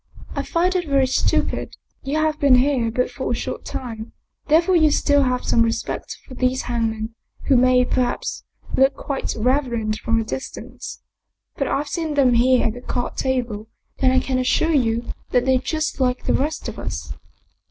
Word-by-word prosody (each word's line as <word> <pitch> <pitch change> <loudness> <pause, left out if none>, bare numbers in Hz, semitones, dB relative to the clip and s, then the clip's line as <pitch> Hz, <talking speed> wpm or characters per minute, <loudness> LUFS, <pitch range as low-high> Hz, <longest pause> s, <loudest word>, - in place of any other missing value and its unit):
" - - -13
I - - 0
find 360 +2 0
it 355 -3 0
very 275 -1 +4
stupid. 260 - 0 0.3
You 280 +3 -2
have 310 -1 +1
been 280 -3 +6
here 250 -2 +2
but 250 +2 -1
for - - -4
a - - +1
short - - -5
time, 225 -3 -6 0.3
therefore 335 +4 +4
you 315 -2 +5
still 285 -1 +3
have 250 -2 0
some 230 - +3
respect 230 0 -2
for - - -10
these 255 +1 0
hangmen, 225 -2 -2 0.3
who 275 - +3
may, 250 0 +5
perhaps, 250 -1 -1 0.3
look 270 +1 +4
quite 275 -2 -3
reverend 235 -3 0
from 230 0 +1
a - - 0
distance. 265 +4 -7 0.5
But - - -1
I've 290 +2 -1
seen 320 -1 -3
them 265 -4 +4
here 250 +2 +4
at 220 - 0
the 245 - -9
card 245 -1 -3
table 240 -5 -2 0.3
and 260 -1 +4
I 260 - +4
can 255 0 -1
assure 320 +6 +2
you 235 -4 +1 0.2
that 245 0 +2
they're 260 -1 +3
just 310 +2 -2
like 250 -1 +1
the - - +1
rest 300 +3 -1
of - - -6
us." - - -5
255 Hz, 185 wpm, -22 LUFS, 240-285 Hz, 0.5 s, been